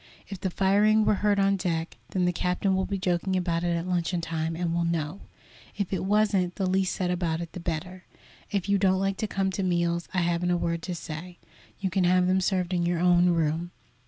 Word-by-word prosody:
If 195 - -6
the 190 - 0
firing 205 +4 +3
were - - +4
heard 205 -1 +3
on 195 0 +3
deck, 170 -3 -2
then 185 -2 0
the 180 - +1
captain 180 +2 0
will 190 0 0
be 200 - -2
joking 185 0 0
about 175 -2 0
it 175 -1 +1
at 170 +2 -4
luncheon 175 -1 0
time, 165 -1 -2
and 170 0 -1
we'll 170 0 +1
know. 170 +1 -2 0.6
If 200 -2 -2
it 190 - -1
wasn't, 200 -3 +2
the 195 - -1
least 190 0 +1
said 180 -1 -1
about 170 -2 -1
it 170 -1 -6
the - - -6
better. 175 +2 -5 0.4
If 200 -2 -2
you 200 0 +2
don't 190 -1 +3
like 195 0 0
to 215 - -2
come 195 -1 -1
to 195 - -3
meals, 170 -2 0
I 185 - +1
haven't 175 +1 0
a 175 - +2
word 170 -1 -1
to 180 +1 -4
say; 170 +2 -7 0.4
you 190 -2 -2
can 185 0 +2
have 180 0 +4
them 185 +1 +2
served 185 -1 0
in 175 -1 +1
your 175 0 +1
own 175 0 +4
room. 165 0 0
180 Hz, 230 wpm, -27 LUFS, 170-190 Hz, 0.6 s, were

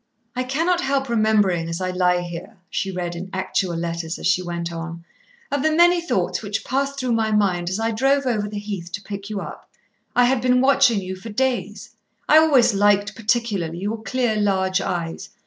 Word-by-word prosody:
"I 250 - 0
cannot 325 +8 0
help 270 -1 0
remembering 210 -7 +2
as 165 +1 -3
I 185 -1 -2
lie 180 -1 +2
here," 175 +5 -8
she 195 - -2
read 175 -2 -4
in 180 +3 -6
actual 190 -1 -1
letters 165 0 -3
as - - -7
she 185 - +3
went 170 -1 -4
on, 165 0 -7 0.5
"of 285 - 0
the 315 - +3
many 345 +2 +5
thoughts 185 - -1
which 205 0 -3
passed 275 +2 -1
through 255 -2 -1
my 225 -1 +1
mind 185 -5 +1
as 190 +3 -2
I 225 +1 0
drove 270 +5 +2
over 215 -5 0
the 210 - -6
heath 200 -4 -5
to 195 - -4
pick 200 +1 -7
you 205 -2 -3
up. - - -9 0.5
I 245 - +5
had 250 0 +2
been 250 0 +3
watching 265 -5 +4
you 190 0 -5
for 190 +5 -9
days. 255 +3 -2 0.4
I 310 - +7
always 280 -8 +4
liked 205 +1 +3
particularly 210 -7 -1
your 210 +4 -3
clear, 230 +1 0
large 190 -2 +1
eyes. 170 -3 -4
205 Hz, 200 wpm, -22 LUFS, 180-250 Hz, 0.5 s, I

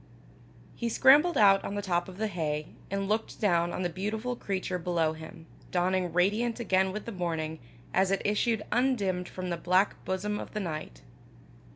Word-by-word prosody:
He 235 - -2
scrambled 290 +9 +5
out 195 -2 +6
on 200 - -4
the 205 - -1
top 175 -1 0
of 185 - -11
the 220 - -1
hay, 155 -6 -2 0.2
and 195 0 -2
looked 215 +2 -1
down 175 -4 +2
on 180 - -3
the - - +2
beautiful 215 +7 -3
creature 190 -4 -3
below 165 -2 0
him, 160 +1 -11 0.2
dawning 180 0 +1
radiant 210 +8 +1
again 190 -4 +2
with 210 +2 -6
the 230 - -5
morning, 160 -4 -3 0.3
as 190 0 +3
it 195 0 0
issued 210 +1 +1
undimmed 205 -8 +1
from 185 -1 -5
the 170 - -1
black 185 +4 +1
bosom 210 +3 -2
of - - -8
the - - 0
night. 155 - -5
190 Hz, 180 wpm, -29 LUFS, 175-210 Hz, 0.3 s, out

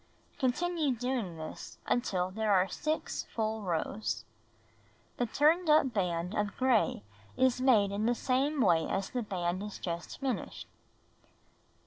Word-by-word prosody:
Continue 295 +2 +1
doing 235 -8 -2
this 155 0 -8
until 185 -6 0
there 215 +1 0
are 190 -1 +4
6 310 +9 -2
full 220 -1 -1
rows. 115 - -2 0.9
The 245 - 0
turned 315 +8 +3
up 300 -5 +5
band 180 -2 -1
of 210 -1 -2
gray 230 - +2 0.3
is 255 -1 +3
made 220 -7 +4
in 210 +3 0
the 240 - +2
same 275 +4 +1
way 170 -6 +3
as 195 0 -2
the 250 - -1
band 185 -3 -2 0.2
just 170 -1 -4
finished. 270 -3 -3
220 Hz, 130 wpm, -31 LUFS, 180-260 Hz, 0.9 s, up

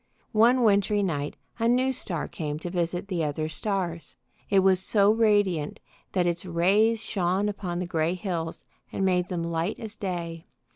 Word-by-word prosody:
One 240 +3 +5
wintry 205 -1 +3
night 145 -6 -2 0.2
a 230 - +2
new 255 +2 +3
star 180 - -3
came 150 -2 -4
to 170 +2 -6
visit 175 +2 -2
the 180 -4 -1
other 155 +1 -1
stars. 175 0 -3 0.3
It 195 -1 +5
was 190 -1 +4
so 200 +1 +3
radiant 205 -8 +2 0.3
that 180 -2 +2
its 170 0 -1
rays 200 +6 +2
shone 190 +1 0
upon 190 -4 -3
the 180 - -2
gray 170 0 0
hills 170 -4 -4 0.3
and 195 - -1
made 180 -1 +2
them 175 -2 -3
light 170 +3 -2
as 220 -2 -7
day. 170 -5 -5
185 Hz, 165 wpm, -27 LUFS, 170-205 Hz, 0.3 s, One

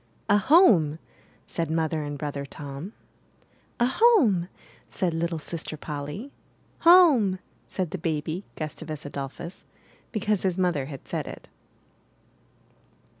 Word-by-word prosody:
'* - - -37
A 205 - +6
homeT' 195 - +5 0.5
said 165 -2 -2
Mother 160 -1 0
and 145 -1 -4
Brother 145 -1 -4
Tom. 140 +6 -8 0.9
'*A 240 - +4
home!'' 255 - +4 0.4
said 180 -3 -1
little 165 +1 -1
Sister 160 0 -5
Polly. 150 - -6 0.5
Home!" 315 - +6 0.3
said 185 -4 -3
the 190 - -4
baby, 160 +2 -2
Gustavus 155 -1 -5
Adolphus, 145 +5 -7 0.4
because 210 -2 0
his 185 -2 0
mother 175 -7 +1
had 140 -3 -9
said - - -3
it. - - -10
170 Hz, 120 wpm, -26 LUFS, 150-205 Hz, 0.9 s, A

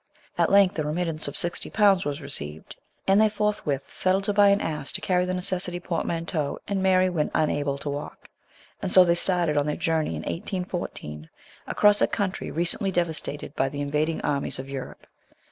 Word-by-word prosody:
At - - +2
length 195 -4 +4
a - - +1
remittance 160 0 -2
of 145 - -3
sixty 175 -2 -1
pounds 200 -3 +4
was 145 +1 -3
received, 80 - -4 0.3
and 195 +2 +5
they 215 - +5
forthwith 205 -10 -2
settled 185 +1 +1
to 205 - 0
buy 205 0 +6
an 200 0 +4
ass 150 -5 -3
to - - -2
carry 180 -1 +1
the 185 - -2
necessary 180 -1 -2
portmanteau 165 -3 -2
and 200 -1 -1
Mary 185 -1 +4
when 165 -5 0
unable 145 -2 +1
to 140 - -8
walk; 145 +1 -7 0.5
and 195 -3 -2
so 185 - +8
they 170 -1 +3
started 175 -3 +1
on 145 0 +2
their 150 - 0
journey 160 - 0
in 75 - -5
1814, 85 - -4 0.4
across 205 0 +4
a - - +5
country 200 -3 -2
recently 175 +4 0
devastated 160 -5 -3
by 135 - +1
the 145 +1 -5
invading 150 +3 -1
armies 140 -1 -1
of 130 - -6
Europe. 135 -1 -7
170 Hz, 185 wpm, -25 LUFS, 145-190 Hz, 0.5 s, so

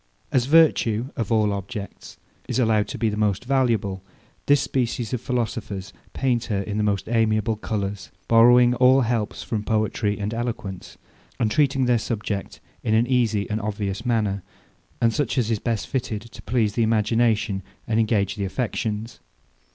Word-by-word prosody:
As 125 -1 +2
virtue, 135 -7 +4
of 115 -3 -3
all 105 -2 +3
objects, 100 +1 -7 0.3
is - - -2
allowed 110 -4 +2
to - - -6
be 115 - +1
the 105 - -1
most 105 +1 0
valuable, 115 -8 +1 0.5
this 145 0 +5
species 120 -3 -2
of 125 - -1
philosophers 110 -6 -3 0.2
paint 125 -3 0
her 100 -4 -1
in 105 +1 -4
the 105 - +1
most 100 -2 0
amiable 110 -1 +1
colours; 105 -2 -4 0.2
borrowing 120 +1 +6
all 130 +2 +5
helps 115 -3 -1
from 110 -3 -2
poetry 105 -1 0
and 105 +1 -3
eloquence, 115 -5 -5 0.4
and 110 -2 +1
treating 135 -2 +2
their 120 -1 +3
subject 105 -3 -4 0.2
in 110 - +1
an 115 +2 +4
easy 115 -5 +1
and 110 +1 -2
obvious 100 0 -3
manner, 110 -5 0 0.6
and 115 -1 +2
such 140 -1 -1
as 115 -3 +1
is 110 - 0
best 115 -2 -2
fitted 120 -5 -3
to - - -11
please 115 -4 0
the 115 - 0
imagination, 110 -2 +1 0.3
and 110 0 +1
engage 105 -3 +1
the 100 - -2
affections. 110 +1 -3
110 Hz, 165 wpm, -23 LUFS, 105-120 Hz, 0.6 s, borrowing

